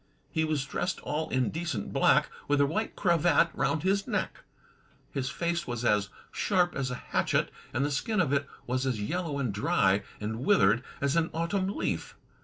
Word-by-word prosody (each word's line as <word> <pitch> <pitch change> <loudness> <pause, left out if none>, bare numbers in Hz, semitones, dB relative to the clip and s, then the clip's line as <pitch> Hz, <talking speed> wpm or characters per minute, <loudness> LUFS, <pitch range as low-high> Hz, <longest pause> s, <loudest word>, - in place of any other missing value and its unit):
He 160 - +1
was 155 -3 0
dressed 180 +6 -2
all 155 +2 -2
in 130 -1 +1
decent 160 - -3
black, - - +4 0.2
with 145 0 +2
a 140 - +5
white 215 +10 -2
cravat 170 -2 +3
roimd 160 - 0
his 195 +1 +1
neck. - - -2 0.7
His 130 -1 -2
face 170 +4 -2
was 120 -1 -3
as 105 -3 +2 0.2
sharp 180 -3 +1
as 135 -2 -1
a 125 - -3
hatchet, - - 0 0.2
and 130 +4 0
the 145 - -1
skin 215 +10 0
of 155 -7 +2
it 140 0 +1 0.2
was 130 +2 -1
as 125 -5 -1
yel 175 - -2
low 140 - -2
and 125 -7 -1
dry 100 -1 +2 0.2
and 110 +2 -3
withered 125 - +4 0.2
as 140 +1 +1
an 165 0 +2
autumn 175 +4 0
leaf. - - -2
145 Hz, 190 wpm, -29 LUFS, 125-170 Hz, 0.7 s, a